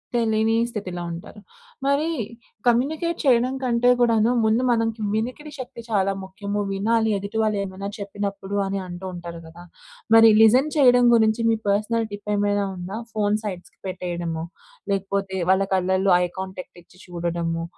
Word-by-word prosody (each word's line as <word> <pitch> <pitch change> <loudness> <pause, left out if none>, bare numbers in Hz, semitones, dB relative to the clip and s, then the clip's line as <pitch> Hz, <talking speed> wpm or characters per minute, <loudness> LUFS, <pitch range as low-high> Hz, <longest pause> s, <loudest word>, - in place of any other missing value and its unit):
తెలీని 225 -1 +2
స్థితిలో 190 -6 -5
ఉంటారు. 170 +5 -9 0.5
మరి 280 +3 +2 0.6
కమ్యూనికేట్ 305 +8 +1
చేయడం 255 -1 +3
కంటే 245 -1 +2
కూడాను 230 -1 +3
ముందు 220 +3 +2
మనకి 225 -1 0
వినికిడి 250 +7 -3
శక్తి 250 -2 -7
చాలా 195 -3 +2
ముఖ్యము. 200 +2 -4
"వినాలి 220 +3 +1
ఎదుటి 200 +3 -5
వాళ్ళు 215 -1 +1
ఏమైనా 195 +1 -6
చెప్పినప్పుడు" 200 0 -4
అని 195 0 -2
అంటూ 175 +2 -8
ఉంటారు 170 -1 -7
కదా! 170 +2 -13 0.5
మరి 225 0 +9
లిజన్ 250 +7 +5
చేయడం 245 -3 +6
గురించి, 220 0 +3
మీ 225 - +3
పర్సనల్ 220 +3 +1
టిప్ 205 0 -7
ఏమైనా 205 0 +1
ఉందా? 185 +3 -6 0.2
ఫోన్ 210 0 +1
సైడ్స్‌కి 185 -4 -7
పెట్టేయడము. 175 -3 -4 0.5
లేకపోతే 195 0 -2
వాళ్ళ 190 +1 +3
కళ్ళల్లో 190 +1 +1
ఐ - - +2
కాంటాక్ట్ 185 -1 -7
ఇచ్చి 175 - -23
చూడడము. 170 -1 -3
205 Hz, 140 wpm, -23 LUFS, 190-230 Hz, 0.6 s, మరి